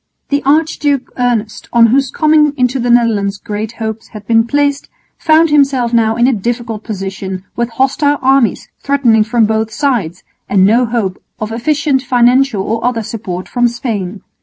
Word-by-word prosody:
The 285 0 0
Archduke 290 -2 +1
Ernest, 240 -4 -2
on 235 -1 +5
whose 265 +3 +2
coming 305 0 +2
into 255 +1 0
the 245 0 -1
Netherlands 220 -5 +2
great 215 +2 -5
hopes 220 -1 -5
had 215 -2 -11
been 225 +1 +2
placed, 285 +1 0 0.3
found 320 0 +3
himself 270 -5 +2
now 225 -1 +2
in 235 +1 +2
a 260 - +3
difficult 230 0 -3
position 190 -2 -5
with 235 0 -1
hostile 270 +4 +1
armies 265 -5 +1
threatening 250 -6 +2
from 225 +1 +1
both 220 0 -1
sides 215 - -2 0.3
and 190 -1 +3
no 235 +4 +3
hope 220 -5 -2 0.2
of 215 0 -4
efficient 280 +3 0
financial 250 -3 +2
or 225 +2 -3
other 240 -2 -1
support 185 -5 -6
from 245 -1 +1
Spain. 215 -5 -4
235 Hz, 160 wpm, -14 LUFS, 215-270 Hz, 0.3 s, on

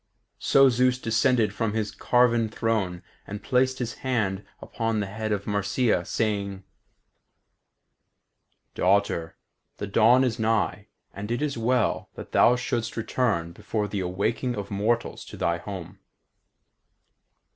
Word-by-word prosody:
So 135 0 +5
Zeus 125 0 +3
descended 115 -2 +2
from 105 +1 -1
his 110 -1 -1
carven 120 -2 +2
throne 105 -6 -1 0.2
and 105 +1 -7
placed 130 +1 +2
his 120 -2 -4
hand 105 -7 -1 0.2
upon 115 -2 -2
the 100 - -1
head 110 +2 -4
of 100 -1 -1
Marcia, 100 -1 +1
saying: 100 -3 -2 2.1
"Daughter, 95 -3 +1 0.4
the - - -4
dawn 115 +6 +5
is 120 -3 -1
nigh, 110 -2 0 0.3
and 100 +2 -6
it 120 +5 -1
is 145 -2 -1
well 120 0 0
that - - -9
thou 125 - +5
shouldst 120 -2 -3
return 110 -7 0
before 105 +4 -3
the 105 0 -3
awaking 100 +7 -1
of 100 -1 -6
mortals 110 +4 -1
to - - -10
thy 85 0 0
home. 95 0 -8
110 Hz, 130 wpm, -26 LUFS, 100-120 Hz, 2.1 s, So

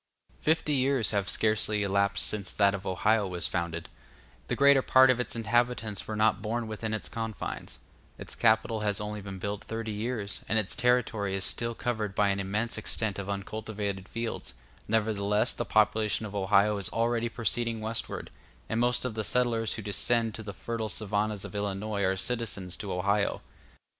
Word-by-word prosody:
Fifty 155 -1 +2
years 135 -3 +3
have 100 -4 0
scarcely 110 +1 +1
elapsed 100 0 +2
since 100 -4 -1
that 100 -1 +3
of 100 0 -5
Ohio 105 +3 +2
was 90 -2 +3
founded; 85 -2 -3 0.6
the - - 0
greater 140 0 +6
part 130 0 +6
of 125 - 0
its 125 - -1
inhabitants 115 -2 0
were 110 - -3
not 105 -2 +3
born 115 +2 -2
within 110 0 -4
its 110 - -2
confines; 115 -1 -5 0.4
its - - -7
capital 110 0 +2
has 105 -1 0
only 105 0 -4
been 95 -1 -7
built 100 +2 -4
thirty 115 -1 -4
years, 105 -1 -3
and 110 - +3
its 105 -3 +1
territory 115 -5 +1
is 95 - -2
still 115 +3 -1
covered 110 -5 -2
by 105 -1 +3
an 100 0 0
immense 105 +4 -1
extent 110 -3 -2
of 100 0 -5
uncultivated 100 -1 -4
fields; 115 - -4 0.3
nevertheless 105 0 +1
the - - -3
population 110 0 +2
of 105 - -7
Ohio 100 +1 +3
is 100 - -1
already 115 0 0
proceeding 115 0 -1
westward, 110 +1 -4 0.4
and 110 - -1
most 120 +1 +1
of 125 - -2
the 110 0 -2
settlers 115 0 +1
who 110 - -6
descend 115 +2 +1
to 115 - -7
the 105 -2 -6
fertile 110 +1 -4
savannahs 105 -1 -1
of - - -8
Illinois 100 0 -2
are 95 0 +1
citizens 100 -5 -3
of 100 - -5
Ohio. 100 +3 +1
110 Hz, 175 wpm, -29 LUFS, 100-115 Hz, 0.6 s, greater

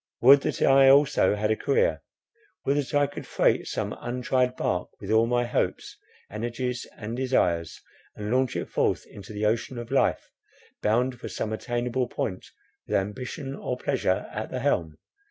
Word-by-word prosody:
Would 135 +3 +8
that - - -1
I 135 0 +6
also 140 -5 +5
had 105 +1 0
a - - +3
career! 480 - +1 0.6
Would 140 +1 +2
that 145 0 -2
I 145 0 +4
could 145 - -8
freight - - +2
some - - -3
untried 125 +1 0
bark 90 -6 -1
with 100 +1 -5
all 110 +1 +4
my 120 0 +1
hopes, 120 - -2 0.4
energies, 120 +3 -3
and 110 +2 -5
desires, 90 -11 0 0.4
and 105 +1 -5
launch 130 0 +1
it - - -2
forth - - 0
into 100 +1 -12
the 105 0 -2
ocean 115 +4 0
of 120 0 -7
life—bound 125 -2 -1
for - - -6
some 110 - -3
attainable 120 +2 -1
point, 95 -5 -4 0.4
with - - -1
ambition 130 +7 -3
or 125 - -4
pleasure 125 -9 0
at 110 +1 -4
the 130 - -4
helm! 85 - 0
120 Hz, 165 wpm, -26 LUFS, 110-130 Hz, 0.6 s, Would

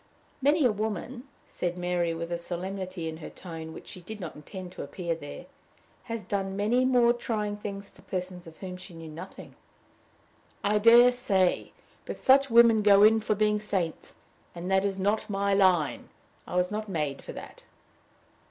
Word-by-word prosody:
"Many 290 +2 +3
a 245 - +5
woman," 220 +4 -4 0.2
said 175 0 -4
Mary, 175 -1 0
with 170 +1 -5
a 170 - 0
solemnity 185 0 -5
in 160 0 -5
her 160 - -8
tone 165 -3 -8
which - - -11
she 180 - -8
did 210 +5 -8
not 170 -5 -6
intend 180 +4 -9
to - - -8
appear 170 +4 -3
there, 145 -3 -8 0.6
"has 230 -3 -4
done 195 -1 -2
many 225 +6 +2
more 245 -2 +4
trying 215 -3 -2
things 200 -1 -6
for - - -20
persons 180 -1 -5
of 160 - -13
whom 185 -1 -7
she 180 -1 -11
knew 165 -1 -9
nothing." 155 - -10 1.1
"I 210 +1 +2
dare 235 +3 +8
say! 200 -8 +1 0.4
But - - -5
such 275 +1 +5
women 230 -2 +6
go 205 -1 +6
in 220 +1 +6
for 215 0 0
being 210 0 +2
saints, 190 -6 -3 0.4
and 175 +2 -5
that 190 +1 +3
is 195 -1 -1
not 205 +3 0
my 200 0 0
line. 185 -6 +2 0.4
I - - -5
was 180 +1 +1
not 215 0 -4
made 150 -6 -2
for - - -8
that." - - -10
195 Hz, 180 wpm, -28 LUFS, 175-215 Hz, 1.1 s, dare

